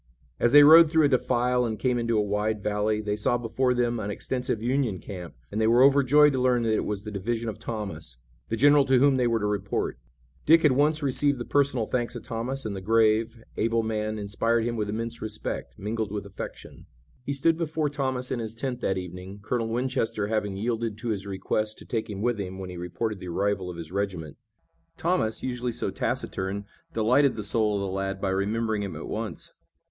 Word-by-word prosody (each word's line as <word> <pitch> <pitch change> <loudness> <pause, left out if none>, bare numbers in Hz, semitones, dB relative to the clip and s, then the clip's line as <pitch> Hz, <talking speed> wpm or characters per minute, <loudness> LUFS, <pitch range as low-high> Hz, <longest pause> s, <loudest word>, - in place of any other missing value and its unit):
As 120 - +3
they 145 +1 +9
rode 160 +2 +9
through 160 -1 +4
a - - +3
defile 125 -1 +2
and 110 -2 -2
came 125 -2 0
into 115 -1 0
a 105 - +3
wide 105 +1 -1
valley 105 +1 0
they 105 -1 -1
saw 105 +3 +1
before 125 +2 0
them 120 -1 0
an 105 -1 -3
extensive 125 +2 -2
Union 120 -3 0
camp, 90 -3 -8 0.2
and 105 - -1
they 110 - +3
were 120 +3 +5
overjoyed 140 +2 +5
to 130 - 0
learn 125 -2 +2
that 110 -1 +1
it - - 0
was 105 -1 -3
the 105 - -6
division 115 +4 -2
of 110 0 -7
Thomas, 105 - -5 0.3
the 115 - 0
general 145 +4 +6
to 130 -1 +4
whom 135 +1 +4
they 125 -1 +2
were 115 -1 +2
to 105 - -2
report. 100 -1 -2 0.4
Dick 165 +1 +5
had 150 - +6
once 150 +3 +2
received 140 +1 +1
the 120 - -5
personal 140 -5 +1
thanks 120 +2 -2
of 120 - -7
Thomas, 125 +3 -4
and 105 -2 -3
the 95 - -5
grave, 115 +2 +2
able 115 +1 +1
man 110 -1 -2
inspired 110 +3 0
him 120 0 -1
with 105 -2 -2
immense 115 +2 -4
respect, 110 0 -5
mingled 110 +1 -3
with 105 -2 -4
affection. 100 -1 -9 0.4
He 140 - -2
stood 160 +4 +2
before 160 -2 -1
Thomas 130 -3 -2
in 120 - -1
his 110 -1 -5
tent 125 +1 -4
that 95 - 0
evening, 90 +2 -7
Colonel 115 +1 -1
Winchester 115 -3 -1
having 105 -3 -1
yielded 115 0 -2
to 115 +2 -4
his 100 -2 -3
request 105 +3 -2
to - - -12
take 110 -2 -3
him 100 0 -5
with 120 -2 0
him 95 -1 -5
when 95 -1 -6
he - - -8
reported 95 +5 -3
the 90 - -8
arrival 95 +1 -1
of 90 - -7
his 85 -1 -8
regiment. 90 -6 -3 0.6
Thomas, 170 -11 0
usually 125 -1 -2
so - - -3
taciturn, 95 +2 -3 0.3
delighted 125 +5 +3
the 110 - -4
soul 105 0 +1
of 100 - -1
the 100 - -2
lad 95 0 -3
by 95 -1 -1
remembering 105 +3 0
him 100 -2 -4
at - - -7
once. - - -5
115 Hz, 215 wpm, -26 LUFS, 105-125 Hz, 0.6 s, they